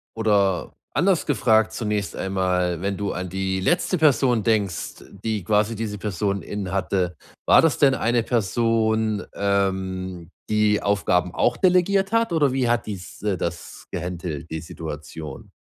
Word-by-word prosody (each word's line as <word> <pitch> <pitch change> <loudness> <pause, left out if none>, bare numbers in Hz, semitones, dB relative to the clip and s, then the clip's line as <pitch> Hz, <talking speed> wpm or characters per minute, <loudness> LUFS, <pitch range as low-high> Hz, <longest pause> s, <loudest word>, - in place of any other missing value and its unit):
oder 100 -4 +1 0.2
anders 185 -2 +2
gefragt 110 -5 +3
zunächst 105 -3 -2
einmal, 90 -2 0
wenn 100 0 -2
du 100 -1 -2
an 90 -1 -4
die 95 0 -1
letzte 175 - +1
Person 130 -7 +3
denkst, 105 -6 -1 0.2
die 110 -4 -1
quasi 105 +3 +1
diese 105 -1 -4
Person 100 0 -2
in 100 -3 -5
hatte, 95 -2 -1 0.3
war - - +7
das 165 -3 +2
denn 135 -2 +5
'ne 120 -1 +1
Person, 110 -1 +1
ähm, 95 -3 -1 0.2
die 105 -1 +2
Aufgaben 90 -3 +1
auch 120 +5 +1
delegiert 190 - +3
hat 230 -4 +2
oder 145 -5 +3
wie 130 -3 +1
hat 120 0 +1
dies, 95 -4 -8
äh 100 -3 0
das 85 0 -5
gehandelt, 85 -3 -5
die 80 -1 -3
Situation? 75 -2 -8
100 Hz, 145 wpm, -23 LUFS, 95-115 Hz, 0.3 s, war